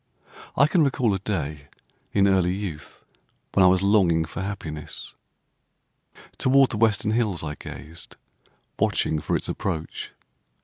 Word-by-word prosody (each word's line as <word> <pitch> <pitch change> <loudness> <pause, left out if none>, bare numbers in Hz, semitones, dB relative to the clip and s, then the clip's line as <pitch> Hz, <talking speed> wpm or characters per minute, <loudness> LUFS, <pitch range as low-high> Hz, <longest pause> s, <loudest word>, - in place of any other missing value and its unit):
I 140 - +7
can 160 +2 +3
recall 125 -6 +2
a 95 - -1
day 75 -7 -4 0.4
in 100 -1 +3
early 95 -2 +2
youth 90 -7 -7 0.5
when 95 - +5
I - - +8
was 95 +1 +4
longing 90 -6 +3
for 80 - -6
happiness. 80 -7 -6 1.3
Toward 135 0 +4
the 110 - -2
western 105 -1 +2
hills 110 -7 0
I 75 -1 -3
gazed, 80 +2 -9 0.6
watching 75 - +1
for - - -1
its - - -5
approach. 80 -5 -4
95 Hz, 135 wpm, -25 LUFS, 80-105 Hz, 1.3 s, I